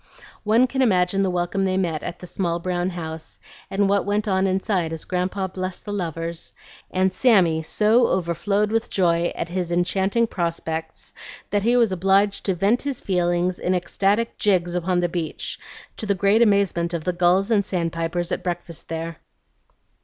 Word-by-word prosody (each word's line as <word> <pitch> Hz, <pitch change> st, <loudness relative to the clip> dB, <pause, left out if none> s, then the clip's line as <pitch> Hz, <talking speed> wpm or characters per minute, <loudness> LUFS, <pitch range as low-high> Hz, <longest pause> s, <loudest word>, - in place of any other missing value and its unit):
One 225 Hz, +4 st, +4 dB
can 265 Hz, +1 st, -2 dB
imagine 195 Hz, -4 st, +2 dB
the 195 Hz, -, +2 dB
welcome 180 Hz, +2 st, -1 dB
they 190 Hz, -1 st, +1 dB
met 165 Hz, -5 st, -1 dB
at 175 Hz, -, -6 dB
the -, -, -10 dB
small 175 Hz, -1 st, -2 dB
brown 175 Hz, +1 st, -1 dB
house, 160 Hz, -3 st, -7 dB, 0.3 s
and 195 Hz, +1 st, +1 dB
what 200 Hz, 0 st, +2 dB
went 205 Hz, +2 st, -1 dB
on 190 Hz, -1 st, +2 dB
inside 190 Hz, -3 st, 0 dB
as 165 Hz, -1 st, -6 dB
Grandpa 185 Hz, +1 st, -1 dB
blessed 185 Hz, 0 st, -5 dB
the 205 Hz, -, -4 dB
lovers, 165 Hz, -3 st, -4 dB, 0.4 s
and 185 Hz, 0 st, +1 dB
Sammy 185 Hz, -8 st, +4 dB
so 215 Hz, +9 st, +3 dB
overflowed 200 Hz, +4 st, 0 dB
with 225 Hz, 0 st, 0 dB
joy 170 Hz, -2 st, +1 dB
at 170 Hz, -, -4 dB
his 175 Hz, -1 st, -3 dB
enchanting 190 Hz, +6 st, +1 dB
prospects, 165 Hz, -4 st, -4 dB, 0.4 s
that 205 Hz, 0 st, +2 dB
he 235 Hz, +4 st, +3 dB
was 230 Hz, -4 st, +3 dB
obliged 195 Hz, +2 st, +2 dB
to 190 Hz, -, +1 dB
vent 200 Hz, +7 st, +2 dB
his 280 Hz, -3 st, -3 dB
feelings 175 Hz, -1 st, 0 dB
in 185 Hz, -, 0 dB
ecstatic 200 Hz, +5 st, 0 dB
jigs 180 Hz, -4 st, +2 dB
upon 180 Hz, 0 st, 0 dB
the 175 Hz, -, +2 dB
beach, 170 Hz, -2 st, -4 dB, 0.4 s
to 215 Hz, -, -5 dB
the 200 Hz, -, +2 dB
great 200 Hz, +4 st, +3 dB
amazement 195 Hz, -6 st, +2 dB
of 165 Hz, -, -4 dB
the 180 Hz, -, -1 dB
gulls 180 Hz, +4 st, +2 dB
and 205 Hz, -3 st, +4 dB
sandpipers 170 Hz, -1 st, -2 dB
at -, -, -1 dB
breakfast 175 Hz, -2 st, -5 dB
there. 165 Hz, 0 st, -4 dB
185 Hz, 175 wpm, -23 LUFS, 175-200 Hz, 0.4 s, One